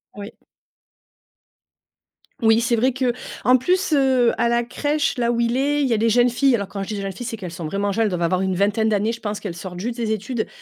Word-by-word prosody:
Oui. 205 0 -8 2.1
Oui, 225 0 +4
c'est 235 0 +1
vrai 255 +3 +2
qu'en 255 0 0
plus, 360 +8 0
heu, 265 -4 +3
à - - +2
la 235 0 +1
crèche, 290 +4 -1
là 235 -1 +1
où 235 0 0
il 235 +1 +1
est, 290 +2 +1
il 280 - +2
y - - +2
a - - +2
des 225 +2 +1
jeunes 240 +2 +4
filles. 255 +2 +2
Alors 200 -4 -4
quand 200 - -5
je - - -8
dis 215 - -4
des 200 - -4
jeunes 195 0 -3
filles, 215 +6 -8
c'est 235 -1 -4
qu'elles 185 -6 -7
sont 165 0 -7
vraiment 200 +5 -1
jeunes. 225 +3 +1
Elles 215 - +1
doivent 180 -2 -3
avoir 170 +2 +1
une 190 -1 0
vingtaine 205 +3 +1
d'années. 215 +1 +1
Je 235 - -6
pense 210 -2 -4
qu'elles 185 -5 -5
sortent 180 0 -7
juste 235 +5 -4
des 230 -2 -2
études, 220 +2 -3
230 Hz, 255 wpm, -21 LUFS, 200-250 Hz, 2.1 s, Oui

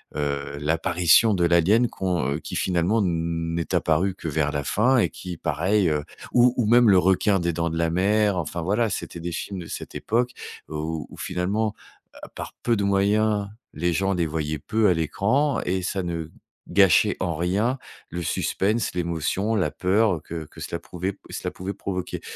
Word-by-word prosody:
heu, 70 -1 -2
l'apparition 85 +6 +3
de 85 -1 +2
l'alien 95 +8 +4
qu'on 90 -8 -1
heu, - - -3
qui - - -7
finalement 95 +5 +1
n'est 85 -1 -1
apparu 90 +4 +1
que 85 - -7
vers 75 -1 0
la 70 -1 -2
fin 125 - +2
et 115 - +3
qui 90 -2 -8
pareil, 90 +6 +1
heu 75 -1 0 0.3
ou 125 0 +5
ou 120 - +2
même 120 +1 +5
le 95 - +6
requin 95 +2 +3
des 85 -1 -1
Dents 85 +1 -1
de 80 - -4
la 85 0 +1
mer, 100 +2 +2
enfin 85 0 -3
voilà, 110 +5 +1
c'était 85 - -5
des 85 +1 -4
films 95 +3 -5
de 85 - -7
cette - - -7
époque, 120 +2 0 0.4
heu, 80 - -7
où 80 +1 -3
où - - -13
finalement, 100 +4 -1 0.4
heu, - - -12 0.2
par - - -7
peu 120 - +2
de 100 - -1
moyens, 100 +1 +2 0.3
les 85 +3 0
gens 95 +3 +1
les 85 - +1
voyaient 75 -1 -3
peu 110 +5 +1
à 90 - +5
l'écran 115 - +1
et 95 +1 0
ça 95 +1 -1
ne 85 -2 -4 0.4
gâchait 100 +1 +4
en 85 -3 -1
rien 100 - 0 0.3
le 85 +1 -4
suspense, 105 +6 0
l'émotion, 90 +5 -1
la 95 - +1
peur, 100 +2 +2
heu, 75 - -11
que 80 -2 -6
que - - -14
cela 85 - -4
prouvait 90 +3 -4
p - - -25
cela - - -4
pouvait 95 +2 -5
provoquer. 90 -1 -4
90 Hz, 195 wpm, -24 LUFS, 85-105 Hz, 0.4 s, le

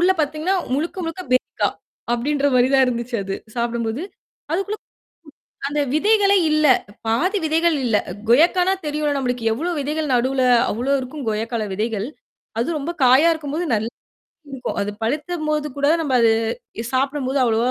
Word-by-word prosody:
உள்ள 360 +2 +4
பார்த்தீங்கன்னா 310 +5 0 0.2
முழுக்க, 320 +6 -2
முழுக்க 330 +3 -5
பேரிக்கா 255 - +1 0.4
அப்பிடின்ற 280 +4 0
மாதிரி 250 0 +4
தான் 265 -1 +6
இருந்துச்சு 240 0 -2
அது. 195 0 -3 0.2
சாப்பிடும்போது. 235 +2 -2 0.5
அதுக்குள்ள 395 +5 -1 0.9
அந்த 295 +1 -1
விதைகளே 405 +3 +4
இல்ல. 305 0 +3 0.4
பாதி 350 - +1
விதைகள் 325 0 +2
இல்ல. 230 -4 +2 0.3
கொயக்கான்னா 355 +8 +4
தெரியும்ல 295 0 0
நம்மளுக்கு 250 -3 -2
எவ்வளவு 320 +7 -2
விதைகள் 300 +1 -2
நடுவுல, 260 +2 +1 0.3
அவ்வளவு 255 +6 0
இருக்கும் 260 0 -7
கொயக்கால 220 +1 -2
விதைகள். 215 0 -2 0.5
அது 235 - 0
ரொம்ப 295 +3 -4
காயா 260 +6 +6
இருக்கும்போது 315 +2 -3
நல்லா 220 +2 -1 0.6
இருக்கும். 260 -2 -4
அது 200 - -2
பழுத்தபோது 305 +4 -1
கூட 280 - +2 0.2
நம்ம 290 -4 -2
அது 225 -1 +5 0.6
சாப்பிடும்போது 275 0 0
அவ்வளவா 230 +1 +2
280 Hz, 140 wpm, -21 LUFS, 240-315 Hz, 0.9 s, தான்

